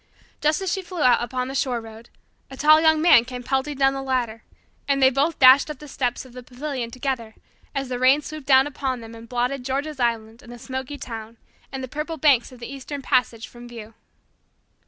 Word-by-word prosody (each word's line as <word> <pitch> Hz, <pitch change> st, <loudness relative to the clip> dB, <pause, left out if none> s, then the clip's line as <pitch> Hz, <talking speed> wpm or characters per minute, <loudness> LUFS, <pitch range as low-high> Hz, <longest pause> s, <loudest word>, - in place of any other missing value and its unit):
Just 305 Hz, +5 st, +1 dB
as 375 Hz, -, -1 dB
she 385 Hz, -, -2 dB
flew 355 Hz, -3 st, -4 dB
out 250 Hz, -1 st, +4 dB
upon 250 Hz, +1 st, -3 dB
the 265 Hz, -, -6 dB
shore 255 Hz, -3 st, -1 dB
road, 225 Hz, +1 st, -12 dB, 0.4 s
a 265 Hz, -, -10 dB
tall 310 Hz, +2 st, +6 dB
Young 315 Hz, -1 st, +3 dB
Man 290 Hz, -9 st, +7 dB
came 250 Hz, 0 st, -8 dB
pelting 270 Hz, +3 st, -2 dB
down 270 Hz, 0 st, +3 dB
the 270 Hz, -, -4 dB
latter, 245 Hz, -4 st, -2 dB, 0.5 s
and 280 Hz, -1 st, +1 dB
they 265 Hz, -1 st, +5 dB
both 285 Hz, +5 st, 0 dB
dashed 260 Hz, +3 st, +7 dB
up 300 Hz, -, -6 dB
the 300 Hz, -, -12 dB
steps 250 Hz, -2 st, -3 dB
of 255 Hz, -, -15 dB
the 250 Hz, -, -9 dB
pavilion 255 Hz, -1 st, -5 dB
together 245 Hz, -3 st, -4 dB, 0.4 s
as 275 Hz, -1 st, -2 dB
the 250 Hz, -1 st, -4 dB
rain 265 Hz, +4 st, +4 dB
swooped 305 Hz, -2 st, -8 dB
down 265 Hz, -1 st, +6 dB
upon 265 Hz, -3 st, -3 dB
them 225 Hz, 0 st, -11 dB
and 230 Hz, 0 st, -12 dB
blotted 250 Hz, +2 st, -1 dB
George's 275 Hz, +3 st, -3 dB
Island 230 Hz, -1 st, -2 dB
and 240 Hz, -, -13 dB
the 240 Hz, -, -9 dB
smoky 260 Hz, +3 st, -6 dB
town 225 Hz, -3 st, -8 dB, 0.3 s
and 265 Hz, -1 st, -5 dB
the -, -, -4 dB
purple 300 Hz, +5 st, -5 dB
banks 275 Hz, -5 st, +3 dB
of 250 Hz, -, -14 dB
the 240 Hz, +3 st, -8 dB
Eastern 275 Hz, +1 st, -7 dB
Passage 250 Hz, -4 st, 0 dB
from 240 Hz, 0 st, -13 dB
view. 225 Hz, -2 st, -10 dB
260 Hz, 220 wpm, -23 LUFS, 240-285 Hz, 0.5 s, Man